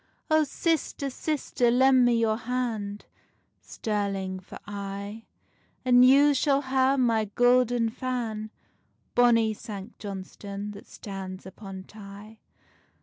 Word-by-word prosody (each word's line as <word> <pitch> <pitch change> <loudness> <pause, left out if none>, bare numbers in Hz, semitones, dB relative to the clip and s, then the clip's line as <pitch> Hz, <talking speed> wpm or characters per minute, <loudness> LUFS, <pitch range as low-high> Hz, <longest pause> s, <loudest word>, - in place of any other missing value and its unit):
Oh, 310 0 +5
sister, 295 -2 -1
sister, 260 -4 0
lend 260 +1 +5
me 240 -1 +3
your 220 -1 +2
hand, 225 -4 -3 0.5
Stirling 195 -3 -3
for 185 - -11
aye: 200 +2 -6 0.6
And 250 0 +6
you 280 +3 +6
shall 280 0 +2
hae 265 0 +2
my 230 -4 +2
gouden 245 -1 +3
fan, 230 -4 -3 0.6
Bonny 230 -2 +4
Sanct 210 0 -9
Johnstonne 200 0 -6
that 200 0 -12
stands 190 -2 -8
upon 190 0 -9
Tay. 210 +2 -12
225 Hz, 110 wpm, -27 LUFS, 200-255 Hz, 0.6 s, And